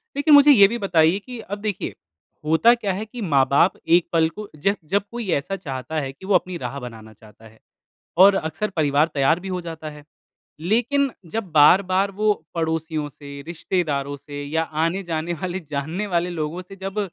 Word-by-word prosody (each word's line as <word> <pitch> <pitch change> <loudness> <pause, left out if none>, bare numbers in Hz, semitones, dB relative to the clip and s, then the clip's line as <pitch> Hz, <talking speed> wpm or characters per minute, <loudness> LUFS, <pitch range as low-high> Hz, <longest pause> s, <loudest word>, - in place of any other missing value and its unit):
लेकिन 290 +1 +3
मुझे 290 0 +8
ये 200 -7 +8
भी 235 +3 -3
बताइए 170 -3 +3
कि 245 +2 -9
अब 205 -1 -6
देखिए 210 -3 -3 0.5
होता 160 +10 +5
क्या 205 -5 -2
है 210 +4 -4
कि 235 +2 -9
माँ-बाप 140 0 +3 0.2
एक 175 - -2
पल 160 -1 +4
को 210 +3 -9
ज 195 +7 +1
जब 200 +4 +1
कोई 235 -3 -5
ऐसा 145 +8 -2
चाहता 150 -3 -5
है 135 -2 -4
कि 140 +8 -14
वो 195 -1 +2
अपनी 180 0 0
राह 135 +1 -5
बनाना 110 -3 -10
चाहता 110 +1 -18
है 110 0 -17 0.6
और 195 +1 +8
अक्सर 160 +6 -2
परिवार 150 0 +2
तैयार 145 +4 +2
भी 190 - -8
हो 185 -1 -3
जाता 160 -2 -7
है, 150 -1 -12 0.6
लेकिन 245 - +1 0.2
जब 220 -5 -4
बार-बार 185 +6 +5
वो 210 +2 +1 0.2
पड़ोसियों 160 -2 -2
से, 140 0 -11
रिश्तेदारों 150 -5 -2
से 145 +1 -8
या 160 +3 -1
आने-जाने 165 +1 -2
वाले 185 +1 -3
जानने 160 +8 -3
वाले 175 -1 -1
लोगों 165 +2 -4
से 195 +2 -13
जब 195 +2 -4
170 Hz, 185 wpm, -22 LUFS, 150-200 Hz, 0.6 s, मुझे